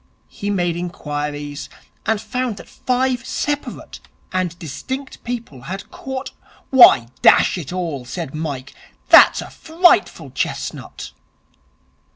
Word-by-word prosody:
He 205 - -5
made 175 -4 0
inquiries, 145 -4 -5 0.4
and 220 -1 +2
found 250 -1 -3
that - - -11
five 250 -1 -1
separate 290 +2 -4 0.3
and 180 -2 -1
distinct 260 - -6
people 235 - -6
had 190 +8 -7
caught 265 0 -6 0.2
' - - -29
'Why, 235 - +8
dash - - +6
it 170 -6 -6
all,' 170 -7 -3
said 140 +3 -6
Mike, 145 -4 -5 0.4
'that's - - +8
a - - -12
frightful 340 +2 +2
chestnut.' - - -4
185 Hz, 120 wpm, -20 LUFS, -, 0.4 s, Why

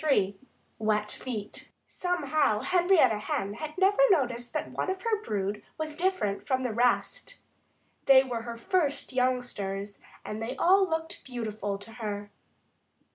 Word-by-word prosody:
III 205 -10 +2 0.4
WET 210 -1 +1
FEET 220 -5 -6 0.2
Somehow 310 -10 0
Henrietta 355 - +4
Hen 200 -1 -2 0.2
never 390 +5 +4
noticed 245 - +1
that - - -3
one - - -2
of 375 0 -3
her 440 -3 0
brood 205 - -2 0.2
was 310 -1 -4
different 350 - -1
from 260 -1 +1
the 245 -3 -1
rest. 245 - +1 0.7
They 265 -1 +8
were 245 -3 -3
her 235 0 -6
first 290 0 0
youngsters 210 -6 -1 0.3
and 210 +1 -5
they 235 +4 -3
all 380 +5 +4
looked 320 0 -3
beautiful 215 -5 -4
to 200 +3 -13
her. 205 -1 -4
250 Hz, 135 wpm, -29 LUFS, 210-325 Hz, 0.7 s, They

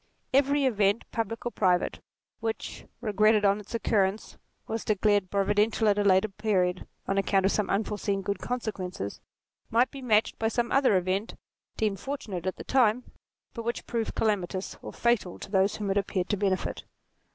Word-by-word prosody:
Every 280 +1 +3
event 205 -3 +2
public 230 0 -3
or 240 - -1
private, 180 -5 +1 0.4
which, 225 -1 -4
regretted 215 -1 +3
on 200 +1 +3
its 210 +2 -8
occurrence, 210 -2 0 0.3
was 225 0 -3
declared 205 -2 +2
providential 210 +3 +2
at 205 0 +3
a - - +2
later 190 +1 +4
period 190 -3 0 0.2
on 195 0 +1
account 195 -1 +2
of 195 - +3
some 210 - 0
unforeseen 200 -1 -1
good 200 0 -2
consequence, 190 - -4 0.5
might 240 +3 +3
be 275 - -8
matched 220 -4 +2
by 225 - +1
some 235 +1 -1
other 270 -8 +4
event, 185 +4 -1 0.4
deemed 210 -3 0
fortunate 200 -10 -5
at 185 - -1
the - - -8
time, 250 -2 +2 0.4
but 230 - -5
which 235 +1 -3
proved 230 -2 -2
calamitous 195 -3 -1
or - - -7
fatal 235 -7 0
to - - -10
those 195 0 +3
whom 205 -2 -2
it 195 - +1
appeared 190 -2 -2
to 205 - +2
benefit. 195 -2 -1
210 Hz, 170 wpm, -28 LUFS, 195-225 Hz, 0.5 s, later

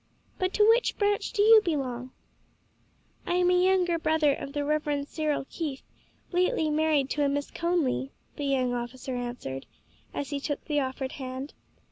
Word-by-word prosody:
But 370 0 +1
to 420 0 +5
which 465 +2 +3
branch 410 0 +1
do 410 -4 +2
you 440 0 +8
belong?" 260 - -2 1.2
"I 350 - +1
am 360 0 +3
a 360 0 +4
younger 365 -3 +3
brother 315 -2 +3
of 275 0 -6
the 290 -1 -1
Reverend 295 -1 0
Cyril 305 -3 -1
Keith, 295 -6 -5 0.5
lately 355 -3 +1
married 300 -3 +2
to 295 - +1
a 280 - +3
Miss 285 0 -2
Conly," 335 -6 0 0.3
the 290 - -4
young 260 -3 +1
officer 245 +2 -4
answered, 240 - -5 0.4
as 285 - -4
he 285 - -1
took 290 +1 -4
the 295 -2 +1
offered 260 -1 -3
hand. 260 +1 -6
295 Hz, 165 wpm, -28 LUFS, 265-350 Hz, 1.2 s, you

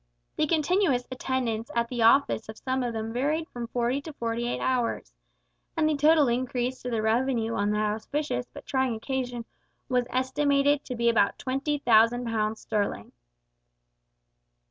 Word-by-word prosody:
The 305 - +1
continuous 315 -4 +1
attendance 250 -3 -2
at 235 0 +1
the 240 -1 -3
office 230 0 +4
of 220 - -8
some 260 0 -2
of 245 -1 -1
them 225 0 -4
varied 300 +6 0
from 240 -1 -6
forty 245 +3 -1
to 315 +1 -9
forty 235 -2 -2
eight - - -2
hours, 240 - -1 0.6
and 310 - +3
the 310 - +2
total 300 0 +5
increase 250 +1 -1
to 250 - -4
the 225 -2 -1
revenue 230 0 +1
on 205 -2 0
that 210 0 +1
auspicious 220 - -3
but - - -11
trying 260 -3 0
occasion 245 0 -3 0.4
was 250 -1 +1
estimated 280 +2 +2
to 250 - -5
be 235 0 0
about 225 -4 +3
twenty 275 +3 -1
thousand 240 -1 +4
pounds 220 -1 -1
sterling! 205 - -2
245 Hz, 160 wpm, -27 LUFS, 230-275 Hz, 0.6 s, total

